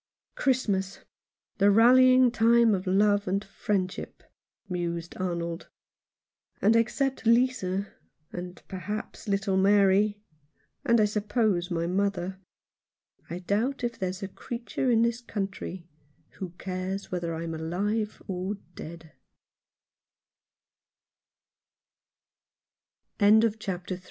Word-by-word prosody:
"Christmas 200 -8 0 0.3
— - - -56
the 200 +1 +5
rallying 255 +3 +6
time 230 -1 +4
of 190 0 -2
love 205 +1 +3
and 195 +2 -1
friendship," 195 -1 -3 0.4
mused 170 -2 -3
Arnold, 170 -2 -3 0.9
"and 215 +3 +4
except 260 +2 0
Lisa 230 -5 +2 0.2
— 155 - -46
and, 180 0 -7
perhaps, 210 +4 -6
little 195 -1 0
Mary 200 +1 +4 0.3
— - - -44
and, 235 -1 +5
I 215 - +5
suppose, 210 -3 0
my 170 -2 -1
mother, 190 0 -1 0.9
I 170 - -4
doubt 220 +9 -1
if 235 -1 -3
there's 185 +1 -3
a - - -2
creature 235 +5 -4
in 230 -1 +4
this 235 +1 0
country 195 -5 -5 0.5
who 190 - -4
cares 185 +1 -4
whether 170 -2 -2
I'm 165 0 -4
alive 200 +7 -2
200 Hz, 95 wpm, -27 LUFS, 185-225 Hz, 0.9 s, rallying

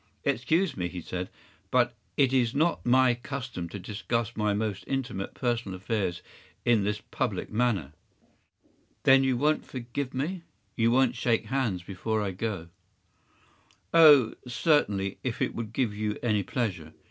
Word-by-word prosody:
“Excuse 160 - +1
me,” 90 -2 -2
he 90 0 -6
said, 90 +2 -5 0.4
“but 120 -1 +3 0.2
it 135 -2 +3
is 125 -2 +2
not 165 +4 +1
my 130 0 +5
custom 125 -7 -5
to 100 - -6
discuss 110 +4 -3
my 105 -1 +1
most 100 -2 -2
intimate 125 -8 -3
personal 115 -6 -2
affairs 95 -3 -2 0.4
in 115 -4 +4
this 105 +1 -1
public - - -2
manner.” 105 - 0 1.1
“Then 135 0 +6
you 130 -2 +2
won’t 150 +4 +2
forgive 125 +2 -5
me? 165 +7 -2 0.3
You 115 0 +3
won’t 125 0 +3
shake 115 -2 +1
hands 110 -7 -1
before 100 +4 -2
I 100 - -2
go?” 95 -3 -4 1.2
“Oh, 150 -8 +8
certainly, 110 - +1
if 125 -3 -3
it - - 0
would 115 -2 -5
give 115 -2 0
you 105 0 -2
any 105 -4 +2
pleasure. 95 - -3
115 Hz, 145 wpm, -28 LUFS, 100-130 Hz, 1.2 s, Oh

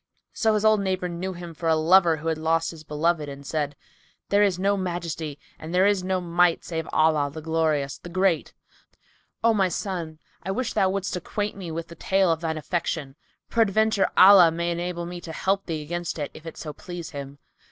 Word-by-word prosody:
So 220 -2 +2
his 210 0 0
old 215 -1 +5
neighbour 185 -2 -1
knew 180 +2 -4
him 175 -1 -8
for 165 +1 -2
a 160 - +4
lover 165 +1 +5
who 160 +2 -6
had 160 -1 -1
lost 165 +1 +1
his 160 -2 -12
beloved 155 0 0
and 140 0 -9
said, 145 -1 -2 0.5
"There 200 +1 +4
is 195 -4 +3
no 200 +2 +2
Majesty 170 -5 -4 0.2
and 160 +3 -6
there 185 +1 +5
is 200 -2 +2
no 185 0 0
Might, 175 -1 +2
save 160 -2 -3
in - - -11
Allah, 155 -2 +3
the 160 - -7
Glorious, 155 -3 0
the 175 - -10
Great! 185 -1 +1 0.9
O 230 0 +5
my 195 -3 +2
son, 170 -4 -4 0.2
I 190 - -7
wish 240 +5 -2
thou 190 - +3
wouldest 195 0 -2
acquaint 205 +4 -3
me 190 -4 -7
with 165 +1 -5
the - - -9
tale 190 +2 +2
of 165 0 -1
thine 160 -1 -2
affliction. 155 -3 -3 0.4
Peradventure 220 -2 +2
Allah 185 -3 +9
may 170 +1 -2
enable 175 0 -3
me 175 0 -7
to 165 - -8
help 195 +4 -1
thee 160 -3 -3
against 175 +2 -4
it, 145 -2 -4
if 160 - -12
it 165 - -8
so 150 -2 -6
please 175 +2 -8
Him." 140 -2 -7
170 Hz, 210 wpm, -25 LUFS, 160-190 Hz, 0.9 s, Allah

